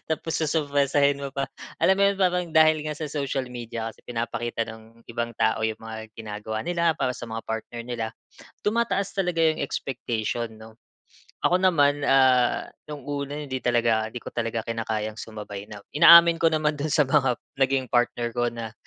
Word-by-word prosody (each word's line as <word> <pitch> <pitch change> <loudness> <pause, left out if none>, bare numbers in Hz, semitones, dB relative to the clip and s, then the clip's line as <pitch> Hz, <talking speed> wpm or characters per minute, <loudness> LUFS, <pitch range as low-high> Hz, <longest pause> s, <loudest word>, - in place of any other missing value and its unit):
tapos 160 +1 -2
sosorpresahin 145 -2 +1
mo 135 - -5
pa. 140 0 -2 0.3
Alam 190 0 +4
mo 200 - +2
'yon? - - -9
Parang 180 -1 +2
dahil 155 -1 +5
nga 155 - -2
sa 150 0 -5
social 140 -3 -2
media 115 -2 -5
kasi 115 - -14
pinapakita 120 -1 -3
ng 110 +1 -13
ibang 115 0 -3
tao 110 0 +2
'yung 110 0 -2
mga 110 -1 -8
ginagawa 110 0 -5
nila, 170 +1 +1
para 125 -1 0
sa - - -7
mga 115 -1 -5
partner 115 +1 -4
nila, 115 -1 -4 0.6
tumataas 210 -2 0
talaga 180 -4 0
'yong 160 -1 +2
expectation, 120 -4 -3
'no? 110 +1 -14 0.6
Ako 180 +1 +3
naman 145 -6 +3
ah, 130 -2 +3 0.2
'nung 145 -3 -7
una 145 0 -4
hindi 135 -3 -4
talaga, 115 -3 +2
hindi 120 +1 -8
ko - - -7
talaga 115 -1 -2
kinakayang 110 -1 -3
sumabay 105 -2 -8
na 100 -1 -10
inaamin 170 +2 +8
ko 165 - +4
naman 155 -2 0
do'n 155 - -1
sa 150 0 +3
mga 135 -3 +2 0.2
naging 135 -1 +1
partner 120 -1 +1
ko 120 +1 0
na, 115 -2 -5
125 Hz, 175 wpm, -25 LUFS, 115-150 Hz, 0.6 s, inaamin